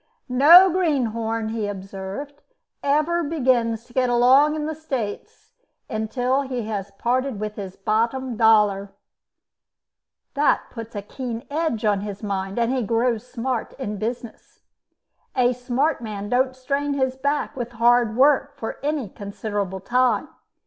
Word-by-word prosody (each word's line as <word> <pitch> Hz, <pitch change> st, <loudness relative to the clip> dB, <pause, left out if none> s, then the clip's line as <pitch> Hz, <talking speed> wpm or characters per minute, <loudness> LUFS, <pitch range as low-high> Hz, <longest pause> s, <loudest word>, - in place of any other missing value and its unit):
"No 310 Hz, +9 st, +8 dB
greenhorn," 230 Hz, -10 st, 0 dB
he 220 Hz, -2 st, -2 dB
observed, 195 Hz, +8 st, -7 dB, 0.4 s
"ever 305 Hz, +5 st, +1 dB
begins 245 Hz, -7 st, +1 dB
to 240 Hz, -, -20 dB
get 255 Hz, -1 st, +2 dB
along 260 Hz, +5 st, +5 dB
in 305 Hz, -1 st, -3 dB
the 315 Hz, -, -2 dB
States 265 Hz, -, -5 dB, 0.4 s
until 245 Hz, +4 st, 0 dB
he 255 Hz, -3 st, -4 dB
has 205 Hz, -2 st, -4 dB
parted 250 Hz, 0 st, 0 dB
with 210 Hz, 0 st, -4 dB
his 195 Hz, -2 st, -7 dB
bottom 230 Hz, +5 st, -1 dB
dollar. 210 Hz, -3 st, +3 dB, 1.4 s
That 290 Hz, +1 st, +1 dB
puts 230 Hz, -1 st, -8 dB
a 205 Hz, -, -4 dB
keen 235 Hz, +1 st, -6 dB
edge 295 Hz, -8 st, -1 dB
on 205 Hz, -2 st, +2 dB
his 205 Hz, 0 st, -7 dB
mind, 195 Hz, -1 st, -3 dB
and 235 Hz, +1 st, +1 dB
he 260 Hz, -, 0 dB
grows 230 Hz, +1 st, 0 dB
smart 250 Hz, -1 st, -3 dB
in 210 Hz, -6 st, -5 dB
business. 235 Hz, +1 st, -6 dB, 0.7 s
A 250 Hz, -1 st, +3 dB
smart 250 Hz, +4 st, -1 dB
man 205 Hz, -2 st, -5 dB
don't 255 Hz, +2 st, +1 dB
strain 280 Hz, +2 st, -2 dB
his 260 Hz, -1 st, 0 dB
back 280 Hz, +2 st, -1 dB
with 240 Hz, -2 st, -5 dB
hard 235 Hz, -1 st, +3 dB
work 280 Hz, +1 st, +3 dB
for 225 Hz, -, -5 dB
any 290 Hz, -5 st, -1 dB
considerable 200 Hz, -1 st, -4 dB
time. 250 Hz, +4 st, +1 dB
240 Hz, 140 wpm, -23 LUFS, 215-270 Hz, 1.4 s, No